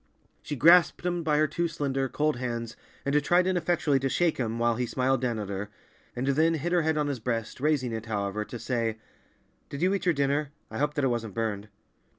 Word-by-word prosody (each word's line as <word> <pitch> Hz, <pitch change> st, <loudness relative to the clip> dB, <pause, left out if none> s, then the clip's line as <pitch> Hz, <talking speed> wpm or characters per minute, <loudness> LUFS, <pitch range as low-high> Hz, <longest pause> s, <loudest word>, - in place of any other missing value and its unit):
She 150 Hz, -, -5 dB
grasped 170 Hz, +5 st, +5 dB
him 175 Hz, -1 st, 0 dB
by 155 Hz, -2 st, +1 dB
her 155 Hz, -, +4 dB
two 170 Hz, +3 st, -1 dB
slender, 135 Hz, -4 st, -2 dB
cold 150 Hz, 0 st, 0 dB
hands 120 Hz, -2 st, -4 dB, 0.3 s
and 145 Hz, +1 st, +2 dB
tried 175 Hz, +4 st, +3 dB
ineffectually 170 Hz, -6 st, +1 dB
to 135 Hz, 0 st, -1 dB
shake 170 Hz, +3 st, +1 dB
him 115 Hz, -2 st, -2 dB
while 120 Hz, 0 st, +2 dB
he 125 Hz, -1 st, -1 dB
smiled 130 Hz, +1 st, +1 dB
down 120 Hz, -3 st, -1 dB
at 105 Hz, -2 st, -5 dB
her, 100 Hz, +1 st, -4 dB, 0.5 s
and 125 Hz, -, -2 dB
then 160 Hz, +4 st, +3 dB
hid 165 Hz, +3 st, -2 dB
her 175 Hz, -1 st, +3 dB
head 160 Hz, -1 st, 0 dB
on 150 Hz, -, +1 dB
his 140 Hz, -3 st, -2 dB
breast, 115 Hz, 0 st, -3 dB
raising 145 Hz, -5 st, +1 dB
it, 110 Hz, 0 st, -5 dB
however, 100 Hz, -1 st, -2 dB
to 120 Hz, -, -8 dB
say, 115 Hz, -1 st, -2 dB, 0.7 s
"Did 140 Hz, +4 st, -4 dB
you 185 Hz, +2 st, +3 dB
eat 195 Hz, -2 st, -2 dB
your 175 Hz, -, +3 dB
dinner? 140 Hz, +1 st, 0 dB, 0.2 s
I 110 Hz, -, -5 dB
hope 150 Hz, +1 st, 0 dB
that 145 Hz, -, 0 dB
it -, -, +4 dB
wasn't 115 Hz, -4 st, -3 dB
burned." 110 Hz, -2 st, -2 dB
135 Hz, 220 wpm, -28 LUFS, 115-155 Hz, 0.7 s, grasped